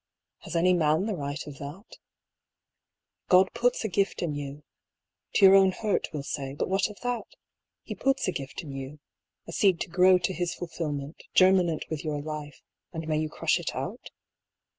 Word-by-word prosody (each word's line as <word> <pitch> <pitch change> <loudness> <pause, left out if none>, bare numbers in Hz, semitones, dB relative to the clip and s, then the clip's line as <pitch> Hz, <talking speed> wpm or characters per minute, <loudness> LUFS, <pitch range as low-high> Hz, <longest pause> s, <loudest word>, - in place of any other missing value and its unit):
Has - - -8
any 180 +2 +4
man 160 +1 +2
the 215 - -1
right 145 -2 -4
of 145 -2 -10
that? 150 +9 -9 1.3
God 185 0 +5
puts 240 0 +1
a - - +2
gift 195 -1 0
in 160 -4 -1
you 145 0 -6 0.3
— - - -52
to 200 - +7
your 190 - +9
own 195 -1 +6
hurt, 210 +2 -1
we'll 150 -3 -4
say, 140 -1 -4
but - - -2
what 190 +1 +1
of 210 - -12
that? 245 -2 -2 0.3
— - - -61
He - - -6
puts 270 -4 0
a - - +2
gift 140 +2 -6
in 145 - -8
you, 135 +2 -7 0.5
a - - -8
seed 185 -1 +3
to - - -3
grow 185 +2 +5
to 180 +1 -1
His 175 -1 -2
fulfilment, 155 -3 -5
germinant 185 -4 +4
with 155 -2 -3
your 150 -2 -2
life, 150 0 -7 0.3
and 160 -2 -6
may 155 -1 +1
you 155 0 -1
crush - - +1
it - - -4
out? - - -5
170 Hz, 195 wpm, -27 LUFS, 150-190 Hz, 1.3 s, your